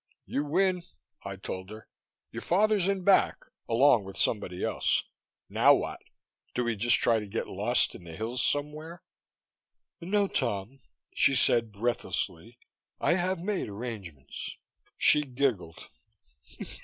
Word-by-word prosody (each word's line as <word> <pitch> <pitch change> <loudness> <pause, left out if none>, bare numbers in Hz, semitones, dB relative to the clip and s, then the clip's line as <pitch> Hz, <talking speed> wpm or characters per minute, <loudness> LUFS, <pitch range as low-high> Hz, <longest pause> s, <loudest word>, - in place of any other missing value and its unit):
"You 140 - -2
win," 180 +4 +1 0.4
I 100 0 -5
told 95 0 -7
her. 110 +1 -11 0.4
"Your - - -6
father's 205 +1 +2
in 195 -2 0
back 195 +1 +4 0.3
along 120 -1 +5
with 95 0 -9
somebody 90 -5 -1
else. - - +1 0.4
Now - - +5
what? - - -4 0.6
Do 125 - +1
we 120 -1 -1
just 120 +6 +4
try 115 -6 +3
to 105 - -7
get 105 +3 -3
lost 105 +6 +2
in - - -11
the 85 -2 -9
hills 115 +5 -2
somewhere?" 150 +4 -2 1.0
"No, 200 +3 +1
Tom," 115 - -2 0.3
she 140 - +4
said 115 -3 +3
breathlessly. 115 -1 -3 0.4
"I - - +2
I 175 - +3
have 180 -1 -1
made 195 - -2
arrangements." 100 - -7 0.4
She 150 - +5
giggled. 125 - -2
120 Hz, 135 wpm, -29 LUFS, 105-165 Hz, 1.0 s, along